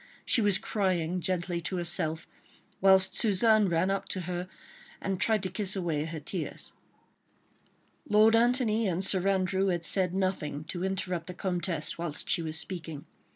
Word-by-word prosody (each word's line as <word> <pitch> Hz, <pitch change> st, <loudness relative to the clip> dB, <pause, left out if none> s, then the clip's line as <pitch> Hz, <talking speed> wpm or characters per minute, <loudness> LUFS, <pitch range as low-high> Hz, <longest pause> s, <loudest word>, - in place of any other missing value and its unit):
She 235 Hz, -, +4 dB
was 205 Hz, -2 st, +3 dB
crying 185 Hz, -4 st, -1 dB
gently 175 Hz, -1 st, -1 dB
to 185 Hz, +3 st, -3 dB
herself, 160 Hz, -2 st, -1 dB, 0.6 s
whilst 190 Hz, 0 st, +6 dB
Suzanne 215 Hz, 0 st, +4 dB
ran 170 Hz, +3 st, +1 dB
up 195 Hz, -, -3 dB
to 185 Hz, -, -2 dB
her 180 Hz, +1 st, -4 dB, 0.5 s
and 195 Hz, -1 st, -3 dB
tried 215 Hz, -1 st, +2 dB
to 185 Hz, -, -2 dB
kiss 195 Hz, +1 st, 0 dB
away 165 Hz, -5 st, -2 dB
her 165 Hz, 0 st, -6 dB
tears. 155 Hz, +2 st, -4 dB, 1.4 s
Lord 215 Hz, +2 st, +5 dB
Antony 230 Hz, -2 st, +2 dB
and 185 Hz, +1 st, -1 dB
Sir 190 Hz, -1 st, +2 dB
Andrew 190 Hz, 0 st, +1 dB
had 175 Hz, -3 st, 0 dB
said 185 Hz, -1 st, +1 dB
nothing 175 Hz, -6 st, -2 dB
to 175 Hz, -1 st, -3 dB
interrupt 185 Hz, -3 st, -3 dB
the 180 Hz, -, -7 dB
Comtesse 175 Hz, -4 st, -2 dB
whilst 165 Hz, -3 st, -2 dB
she 175 Hz, -, +2 dB
was 160 Hz, -1 st, -2 dB
speaking. 160 Hz, -4 st, -5 dB
185 Hz, 155 wpm, -28 LUFS, 170-195 Hz, 1.4 s, whilst